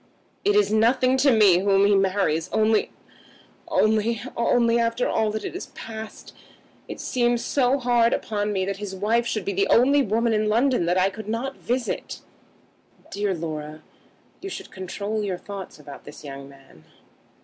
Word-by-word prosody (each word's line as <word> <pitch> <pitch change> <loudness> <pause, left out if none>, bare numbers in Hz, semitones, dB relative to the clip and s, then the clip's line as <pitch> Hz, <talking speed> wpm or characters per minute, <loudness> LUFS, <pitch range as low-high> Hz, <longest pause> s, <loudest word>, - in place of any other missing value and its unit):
It 410 0 +2
is 415 - +3
nothing 255 +4 +3
to 275 +2 +4
me 205 -6 +5
whom 195 0 +3
he 205 - +4
marries 190 -4 +1
only, 220 0 +2 0.8
only, 220 +1 +1 0.2
only, 235 0 +2
after 230 +1 0
all 220 -1 +1
that 215 +1 -4
has 370 - -6
passed 220 -1 -9 0.5
it - - -8
seems 240 -1 0
hard 245 -3 +3
upon 210 -1 -2
me 190 -2 -1
that 195 0 -3
his 200 -2 -6
wife 225 +5 +1
should 215 -4 -2
be 200 - -2
the 195 +1 +1
only 275 +5 +4
woman 230 0 +1
in 215 0 +1
London 240 -4 +2
that 175 +1 +2
I 190 +1 +2
could 215 +1 -8
not 255 +5 -3
visit." 245 0 -3 0.9
"Dear 200 -1 -1
Laura, 155 -2 -6 0.6
you 390 - -6
should - - -8
control 200 +3 -4
your 190 -3 -2
thoughts 195 0 -9
about 145 -1 -12
this 145 - -12
young 140 -1 -9
man." 135 - -18
215 Hz, 160 wpm, -24 LUFS, 190-235 Hz, 0.9 s, me